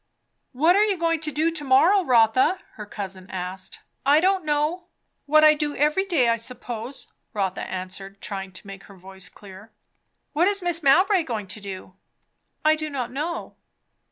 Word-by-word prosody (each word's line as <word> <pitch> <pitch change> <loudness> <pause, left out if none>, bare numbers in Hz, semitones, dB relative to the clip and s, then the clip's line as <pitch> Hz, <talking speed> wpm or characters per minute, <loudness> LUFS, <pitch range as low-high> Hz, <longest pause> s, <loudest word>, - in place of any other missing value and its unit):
"What 315 +7 +3
are 410 - +5
you 410 -3 +1
going 330 -1 +1
to 305 0 -4
do 310 +4 +1
to 315 -3 -5
morrow, 325 +9 +4
Rotha?" 250 +5 +4 0.2
her 210 -1 -9
cousin 190 -2 -7
asked. 185 0 -6 0.2
"I 285 +3 +5
don't 375 +1 +2
know. 305 +4 -1 0.4
What 310 +1 +5
I 305 0 +8
do 295 -1 -3
every 300 +7 +2
day, 320 -11 +2
I 230 0 +2
suppose," 240 +1 -6 0.3
Rotha 195 -2 -1
answered, 190 +1 -7
trying 195 -1 -6
to 185 - -11
make 195 -1 -10
her 200 - -15
voice 190 +1 -7
clear. 200 +2 -14 0.6
"What 330 +4 +3
is 405 -1 +1
Mrs. 350 -2 0
Mowbray 370 +7 +4
going 230 -9 -4
to 205 +2 -10
do?" 190 -2 -8 0.7
"I 310 0 +5
do 310 0 -4
not 255 -4 -4
know." 310 +6 -4
270 Hz, 175 wpm, -24 LUFS, 200-325 Hz, 0.7 s, I